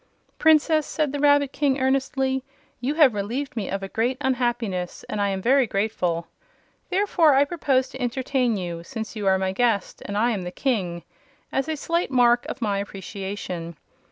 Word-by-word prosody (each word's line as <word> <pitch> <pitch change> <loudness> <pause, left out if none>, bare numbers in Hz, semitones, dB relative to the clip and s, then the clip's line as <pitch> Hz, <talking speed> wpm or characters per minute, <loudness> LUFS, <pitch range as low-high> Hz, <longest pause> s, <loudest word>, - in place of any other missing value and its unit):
"Princess," 315 -1 +4
said 305 -3 -1
the 290 - -2
Rabbit 285 -1 +4
King, 280 -2 +1
earnestly, 265 0 0 0.4
"you 265 +5 -1
have 295 -7 +6
relieved 245 +8 -3
me 215 -5 -3
of 195 0 -3
a - - -3
great 235 +6 -1
unhappiness, 240 -8 -1
and 210 - -2
I 200 - +2
am 190 -1 -3
very 260 +1 +4
grateful. 180 -5 -1 0.6
Therefore 360 -6 +3
I 280 +1 +5
propose 275 -5 +1
to 260 - -9
entertain 250 -1 0
you, 175 -2 -4
since 220 +6 -6
you 205 -2 -2
are 190 0 +4
my 190 0 -1
guest 220 -1 0
and 205 - -3
I 235 +3 +3
am 205 -4 -2
the 180 - -4
King, 180 -7 -2 0.5
as 270 +3 -1
a 315 - -1
slight 335 +4 -1
mark 245 -2 +3
of 250 - -5
my 200 -2 0
appreciation. 190 -4 -6
240 Hz, 180 wpm, -24 LUFS, 195-275 Hz, 0.6 s, have